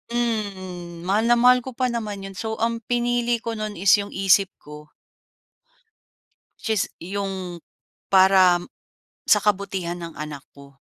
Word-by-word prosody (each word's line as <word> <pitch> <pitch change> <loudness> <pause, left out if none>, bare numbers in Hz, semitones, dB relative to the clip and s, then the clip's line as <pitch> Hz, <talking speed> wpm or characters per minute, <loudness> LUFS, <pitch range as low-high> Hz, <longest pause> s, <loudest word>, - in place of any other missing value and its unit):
mm, 185 -7 -3
mahal 200 +5 +1
na 240 - +5
mahal 250 +1 +5
ko 250 0 -9
pa 255 -1 0
naman 210 -4 -4
‘yun. 195 0 -8
So 220 -1 -3
ang 230 0 0
pinili 240 -1 0
ko 230 -1 -3
no’n 215 -1 -4
is 190 +3 +3
yung 200 0 -6
isip 195 0 +4
ko. 150 0 -12 1.7
Which - - -5
is 215 -3 +2 0.2
yung 190 -1 -4 0.5
para 185 -2 +5 0.7
sa 210 - +6
kabutihan 190 -4 -1
ng 165 -1 -7
anak 150 -2 -6
ko. 140 -1 -15
195 Hz, 145 wpm, -23 LUFS, 180-230 Hz, 1.7 s, sa